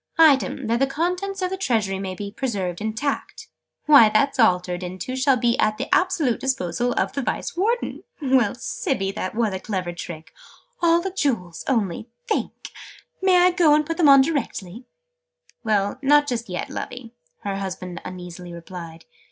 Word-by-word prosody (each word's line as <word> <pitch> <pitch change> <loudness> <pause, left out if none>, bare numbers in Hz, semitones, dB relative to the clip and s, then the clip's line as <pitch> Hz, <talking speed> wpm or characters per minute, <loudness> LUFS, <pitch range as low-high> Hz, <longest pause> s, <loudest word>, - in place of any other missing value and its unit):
"'Item, 285 -4 +4
that 230 +1 +1
the 270 - +3
contents 360 +6 -2
of 365 - -1
the 380 - -2
Treasury 215 - 0 0.2
be 200 +2 -6
preserved 200 -8 -3
intact.' 220 +7 -3 0.4
Why, 280 -8 +8
that's 270 +6 +1
altered 180 -4 +2
into 185 +8 -5
'shall 260 0 +3
be 240 -1 +2
at 215 0 +2
the 270 +8 -2
absolute 360 -10 +2
disposal 245 -2 -1
of - - -1
the 275 - -2
Vice 260 - -3
Warden'! 450 +7 -1 0.2
Well, 260 -7 +2
Sibby, 230 -4 -2
that 195 -1 -5
was 225 -3 +1
a 190 - -3
clever 185 -4 -3
trick! 170 -2 -8 0.5
All 340 0 +4
the 385 +2 -3
Jewels, 230 - -2
only 220 -3 -1 0.2
think! 440 -4 -3 0.5
May 375 -1 +4
I 365 - +5
go 340 -4 +4
and 305 0 +2
put 330 +2 -3
them 315 -5 +5
on 275 -1 +9
directly?" 245 - -3 0.8
"Well, 210 0 0
not 290 +1 +5
just 235 -5 -3
yet, 180 -1 -4
Lovey," 240 -2 -7 0.3
her 200 -1 -2
husband 185 -3 -5
uneasily 180 -1 -8
replied. 170 -1 -9
235 Hz, 165 wpm, -23 LUFS, 190-290 Hz, 0.8 s, on